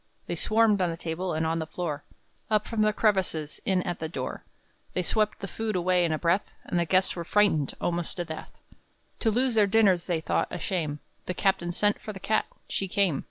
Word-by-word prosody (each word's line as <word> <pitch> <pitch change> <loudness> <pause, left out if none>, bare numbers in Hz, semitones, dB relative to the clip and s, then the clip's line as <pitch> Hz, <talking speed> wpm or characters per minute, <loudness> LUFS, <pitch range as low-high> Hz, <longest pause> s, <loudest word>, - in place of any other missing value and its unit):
They - - -3
swarmed 215 -2 +3
on 180 - +2
the 165 - -4
table, 170 +1 -3
and 160 +1 0
on 165 +1 0
the 160 - -3
floor, 155 -3 -4 0.5
Up 215 -1 +2
from 225 -2 -1
the 215 0 +4
crevices, 190 -8 0
in 185 -2 +2
at 175 0 -3
the 160 - -3
door, 130 -5 -4 0.5
They 180 - 0
swept 215 +4 0
the 195 - -3
food 220 +1 -3
away 180 0 +3
in 170 - +1
a 155 - +1
breath, 175 +5 +1
And 175 - -1
the 170 - +2
guests 185 +2 +2
were 170 - -3
frightened 170 -6 +2
almost 175 0 -2
to 175 - -2
death! 160 -1 -7 0.7
To 225 - +2
lose 250 +3 +2
their 215 -2 +4
dinners 195 -4 +4
they 175 -3 +1
thought 160 - 0
a - - -4
shame. 155 -5 -2 0.3
The 180 - -2
captain 190 -3 +1
sent 205 +4 +1
for 215 - -6
the 190 - -8
cat. 215 +3 +1 0.2
She 195 - -1
came! 185 -6 +2
180 Hz, 220 wpm, -27 LUFS, 165-205 Hz, 0.7 s, the